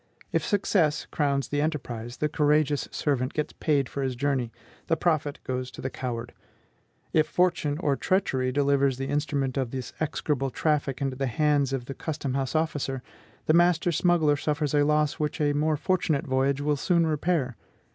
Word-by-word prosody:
If - - +1
success 185 -7 +1
crowns 140 -2 0
the 145 0 0
enterprise, 125 -6 -3
the 150 - +1
courageous 150 -1 +2
servant 135 -3 -1
gets 150 - -2
paid 145 -4 +1
for 140 - -5
his 130 -2 -1
journey; 130 -3 0 0.4
the 165 - +2
profit 155 -4 0
goes 130 0 -3
to 115 - -13
the 130 - -3
coward. 120 -2 -5 0.8
If 155 -1 +4
fortune 170 -5 +1
or 150 -5 +1
treachery 135 -8 0
delivers 140 -1 +2
the 135 +1 -3
instrument 145 -3 -1
of 130 -3 0
this 130 0 -6
execrable 145 -3 -1
traffic 140 -1 0
into 135 -2 -2
the 135 0 -1
hands 145 +1 +2
of 135 -3 -2
the 135 - -5
custom 145 -3 -4
house 135 +1 -2
officer, 145 -5 -1 0.4
the 155 - +3
master 175 0 +4
smuggler 160 -3 +3
suffers 150 -1 -1
a 145 -1 +4
loss 150 0 +1
which 150 +1 -2
a 145 -1 +2
more 150 +1 +1
fortunate 170 -4 0
voyage 135 +1 +1
will 145 0 +1
soon 170 +3 +2
repair. 155 -5 0
145 Hz, 175 wpm, -27 LUFS, 135-155 Hz, 0.8 s, If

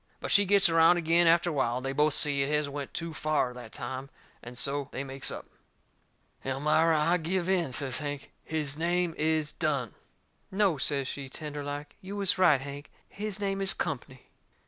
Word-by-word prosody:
But - - -4
she 205 - +5
gets 200 0 +5
around 165 +1 +5
agin 170 +1 +3
after 170 +1 +4
a - - -4
while, 125 -4 0
and 130 - -6
they 135 - -2
both 150 +1 +2
see 140 -2 +3
it 135 - 0
has 150 -1 +1
went 140 -1 -6
too 165 -1 -5
fur 155 -5 0
that 120 -3 -10
time, 130 +2 -6 0.3
and 120 +1 -9
so 140 +1 +2
they 135 - -4
makes 135 0 +1
up. - - -6 1.0
"Elmira, 150 +4 +2
I 170 +4 +2
give 175 +2 -2
in," 180 -7 +1
says 130 +2 -1
Hank. 145 -2 -6
"His 150 -2 -3
name 175 0 0
is 155 -1 0
Dunne." 140 - -1 0.6
"No," 190 -6 +1
says 140 -1 0
she, 135 -1 -5
tender 145 +1 -6
like, 145 +1 -7
"you 195 +1 -7
was 200 -2 +1
right, 155 -8 +5
Hank. 140 +1 -8 0.2
His 210 0 -4
name 195 -1 -2
is 195 -2 +2
Company." 130 -5 -5
150 Hz, 190 wpm, -28 LUFS, 140-170 Hz, 1.0 s, she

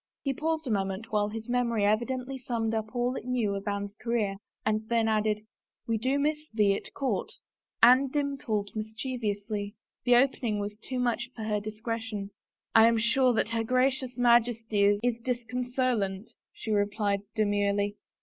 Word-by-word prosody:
He 275 - 0
paused 315 +2 -1
a 250 - -2
moment 195 +2 -2
while 210 -1 +1
his 225 +1 -6
memory 235 -4 +1
evidently 250 +5 0
summed 230 -3 -2
up 220 +1 -3
all 245 +1 0
it - - -5
knew 240 -5 0
of 200 +1 -5
Anne's 200 0 -2
career 215 -3 -1 0.3
and 215 +1 0
then 230 -1 +2
added, 215 -1 +1 0.2
" - - -57
We 225 -1 0
do 260 +5 +1
miss 300 +1 -1
thee 210 -3 +3
at - - -5
court." 255 -9 -1 0.5
Anne 255 +3 +8
dimpled 265 -8 -2
mischievously. 215 -2 -3 0.3
The 245 -1 +5
opening 245 -4 +2
was 205 0 -3
too 255 +4 -5
much 245 0 0
for 220 - -6
her 210 -1 0
discretion. 215 -1 -4 0.2
" - - -63
I 225 0 +8
am 230 0 +3
sure 245 +3 +3
that 225 - +1
her 230 0 0
Gracious 255 +1 +1
Majesty 225 -4 +3
is 240 -1 0
disconso 250 +1 -1
late! 195 +1 -3
" - - -65
she 220 - -6
replied 205 -1 +1
demurely. 205 -1 +1
225 Hz, 170 wpm, -29 LUFS, 210-250 Hz, 0.5 s, Anne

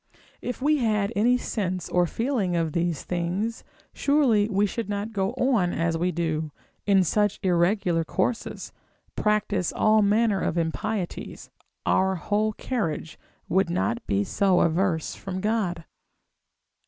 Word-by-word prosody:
If 250 +1 -5
we 305 +1 +4
had 215 -4 0
any 240 +5 +4
sense 185 -7 -3
or 180 -1 +2
feeling 225 - -1
of 165 -3 0
these 170 -3 -1
things, 180 +6 -2 0.3
surely 255 -8 +3
we 200 0 +2
should 210 +1 -4
not 205 +2 -3
go 195 -1 -1
on 225 -10 +1
as 165 0 0
we 175 +2 0
do, 160 -2 -2 0.4
in 195 -2 +5
such 205 +3 +1
irregular 175 -1 +2
courses, 225 +8 -2 0.4
practise 210 -3 0
all 215 0 +3
manner 210 0 +2
of 170 - -1
impieties; 180 +4 -3 0.3
our 190 0 +2
whole 210 +5 0
carriage 200 -11 -3 0.3
would 190 0 +2
not 115 - -1
be 100 0 +1
so 190 - +2
averse 165 -1 +1
from 190 -1 -5
God. 190 -5 -1
195 Hz, 135 wpm, -25 LUFS, 170-215 Hz, 0.4 s, in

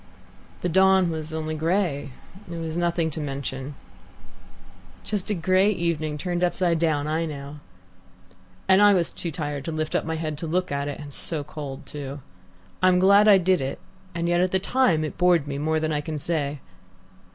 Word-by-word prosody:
"The - - 0
dawn 190 0 +4
was 160 0 -5
only 155 0 -3
grey, 160 -2 0 0.4
it 170 - -5
was 165 -1 -4
nothing 170 -1 0
to 155 - -5
mention 135 -1 -5 0.7
" 90 0 -24
"Just 210 -2 -2
a 210 - +1
grey 185 +3 +3
evening 165 -6 -1
turned 175 +2 -2
upside 175 -2 +1
down. 155 -3 +1
I 160 +2 -1
know." 145 0 -7 0.6
" 90 0 -29
and 190 +1 +6
I 205 -1 +7
was 170 -3 +1
too 170 - -5
tired 145 -4 -4
to 165 - -3
lift 155 0 -3
up - - +1
my 160 0 -3
head 155 -2 -4
to 165 - -4
look 180 +2 -1
at 140 0 -1
it, 145 - -5
and 145 -2 -9
so 155 0 -3
cold 145 -1 -7
too. 140 -1 -7 0.6
I'm 185 -1 +5
glad 200 +3 +6
I 205 -2 +8
did 185 -2 +2
it, 135 +1 -3 0.4
and 170 0 -1
yet 175 0 +2
at 185 - +2
the 190 - +1
time 190 -5 +2
it 155 - -5
bored 175 -4 +4
me 140 -1 -3
more 155 +1 +1
than 155 0 -1
I 150 - 0
can 155 +1 -4
say. 145 -2 -2
160 Hz, 195 wpm, -25 LUFS, 145-180 Hz, 0.7 s, I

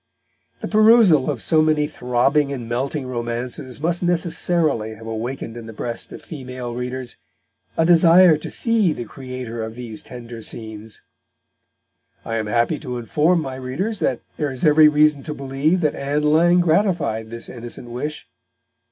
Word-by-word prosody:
The - - -3
perusal 215 - +5
of 135 -6 -2
so 160 -2 +3
many 155 -1 +2
throbbing 140 +1 +1
and 125 -4 -5
melting 135 +4 -2
romances 125 +2 -4
must 170 +3 0
necessarily 165 -9 +1
have 110 +1 -12
awakened 115 +1 -5
in 115 -1 -8
the 115 - -9
breast 115 +2 -4
of - - -10
female 125 -5 -7
readers 125 0 -5 0.6
a 165 - +3
desire 170 0 +6
to 150 - -7
see 220 -8 +2
the 120 - -6
creator 125 -2 -7
of 110 0 -6
these 120 -3 -4
tender 120 -2 -9
scenes. 110 -1 -6 1.2
I 115 - -2
am 110 -1 -2
happy 120 +8 +1
to 125 -4 -5
inform 155 +8 +1
my 135 -4 -5
readers 170 - -3
that - - 0 0.2
there 150 -2 -1
is 130 +2 -1
every 155 0 +7
reason 150 -1 +3
to 150 +1 -6
believe 140 +6 0
that 150 -3 +1
Ann 145 +2 -2
Lang 170 +4 +4
gratified 170 - +1
this 115 0 -5
innocent 120 0 -7
wish. 150 +5 -5
135 Hz, 160 wpm, -21 LUFS, 120-160 Hz, 1.2 s, every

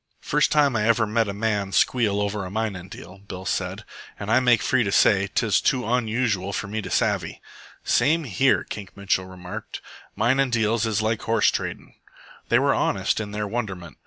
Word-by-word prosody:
"First - - +1
time 145 -4 +3
I 105 -1 +1
ever 115 -1 +3
hear 110 0 0
a - - -1
man 100 -1 -1
squeal 105 -5 +2
over 105 0 -2
a 90 - -6
minin' 100 -3 -3
deal," 95 +2 -11
Bill 95 -1 -9
said. 85 - -3 0.3
"An' 105 +1 -4
I 130 - +5
make 120 -3 +3
free 130 -2 +2
to 100 - -2
say 100 -1 +4
'tis 110 -3 +1
too 130 -2 +1
onusual 110 -4 0
for 105 - -3
me 110 +2 -3
to - - -7
savvy." - - 0 0.4
"Same 155 +7 +2
here," 135 +2 +2
Kink 100 -2 -9
Mitchell 100 -2 -1
remarked. 90 +4 -8 0.4
"Minin' 135 +2 +2
deals 115 -1 +1
is 110 -1 0
like 110 0 0
horse 115 0 +2
tradin'." - - -5 0.6
They - - +5
were - - +3
honest - - 0
in 110 -2 -4
their 105 0 -3
wonderment. 95 - -5
110 Hz, 190 wpm, -24 LUFS, 100-115 Hz, 0.6 s, I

